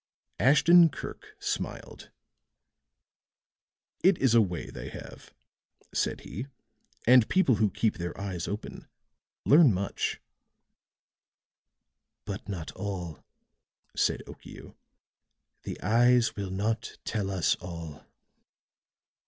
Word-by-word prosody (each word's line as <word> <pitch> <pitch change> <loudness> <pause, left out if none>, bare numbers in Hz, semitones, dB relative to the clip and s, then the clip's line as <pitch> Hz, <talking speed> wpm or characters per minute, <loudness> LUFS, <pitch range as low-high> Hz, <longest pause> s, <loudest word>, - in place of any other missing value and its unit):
Ashton 165 +5 +6
Kirk - - -9
smiled. - - -5 1.9
"It 190 +2 +5
is 130 -4 +2
a 115 - +7
way 90 -5 -3
they - - -7
have," - - -11 0.6
said - - -1
he. 110 - -7 0.6
"And 125 -1 +6
people 165 - +3
who 105 +1 +2
keep 110 +3 0
their 85 +2 -5
eyes 95 -5 -4
open 105 +1 -6 0.6
learn 150 -2 +7
much." 100 +1 -2 2.1
"But 100 0 -6
not 85 -5 -5
all," 90 -6 -6 0.7
said - - +1
Okiu. - - -12 0.9
"The - - -5
eyes 120 +2 +3
will 100 -2 -4
not 110 +5 -2
tell 105 -3 -2
us 95 -3 +1
all." 85 -4 -8
105 Hz, 100 wpm, -28 LUFS, 95-125 Hz, 2.1 s, a